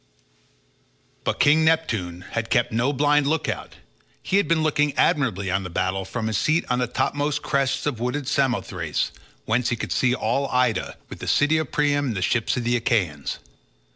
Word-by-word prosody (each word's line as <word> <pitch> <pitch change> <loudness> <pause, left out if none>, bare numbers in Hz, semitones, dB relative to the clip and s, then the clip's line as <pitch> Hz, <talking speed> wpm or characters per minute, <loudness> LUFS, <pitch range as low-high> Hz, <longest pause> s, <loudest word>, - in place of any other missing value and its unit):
But - - -1
King 155 +2 +5
Neptune 110 - 0
had 115 -1 -3
kept 120 0 +2
no 120 +5 +1
blind 145 +1 +2
look 160 +1 0
out; - - -4 0.5
he 195 - +1
had 200 - +2
been 165 -1 +2
looking 150 -2 +1
admiringly 100 -10 +1
on 95 +1 +1
the 95 - -6
battle 95 +2 -1
from 110 +4 -4
his 110 -2 0
seat 160 +2 +1
on 125 - +1
the 125 - 0
topmost 145 +4 -1
crests 135 0 0
of 140 -6 -2
wooded 125 +3 -2
Samothrace, 100 - -1 0.3
whence 115 +2 +1
he 120 - 0
could - - -5
see 125 -1 +2
all 135 +4 0
Ida, 125 -3 0
with - - -10
the - - -6
city 150 +2 +3
of 155 -5 -4
Priam 145 -1 +1
and 115 - -2
the 95 - -1
ships 120 +5 +1
of 125 - -1
the 120 +1 +1
Achaeans. 95 - 0
125 Hz, 190 wpm, -23 LUFS, 110-145 Hz, 0.5 s, King